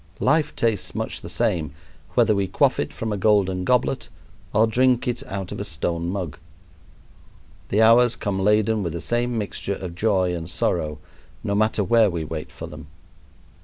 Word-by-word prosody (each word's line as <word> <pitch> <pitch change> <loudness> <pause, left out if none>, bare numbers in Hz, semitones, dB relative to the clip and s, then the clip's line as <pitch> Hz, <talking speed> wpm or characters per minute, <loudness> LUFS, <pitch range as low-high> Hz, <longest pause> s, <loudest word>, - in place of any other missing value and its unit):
Life 150 +3 +2
tastes 115 -3 0
much - - -3
the - - -8
same, 80 -4 0 0.4
whether 115 -3 +4
we 100 -1 0
quaff 95 - +2
it - - -2
from 110 -2 -4
a - - -2
golden 95 -2 +2
goblet 125 +5 +1 0.4
or 110 +2 +4
drink 125 +2 +2
it 120 -1 -1
out 95 -2 -5
of - - -5
a - - -2
stone 85 0 -2
mug. 90 -5 -4 1.3
The 105 +3 +3
hours 115 +1 +6
come 100 -2 -2
laden 105 +2 +2
with 85 -4 -3
the 85 - -4
same 120 +7 -1
mixture 100 -1 -3
of 90 -3 -6
joy 95 -2 +1
and 85 -1 -5
sorrow, 75 -2 0 0.5
no 100 - -1
matter 110 0 +2
where 115 0 +4
we 85 -3 -3
wait 80 0 -6
for - - -8
them. - - -10
100 Hz, 175 wpm, -23 LUFS, 90-115 Hz, 1.3 s, hours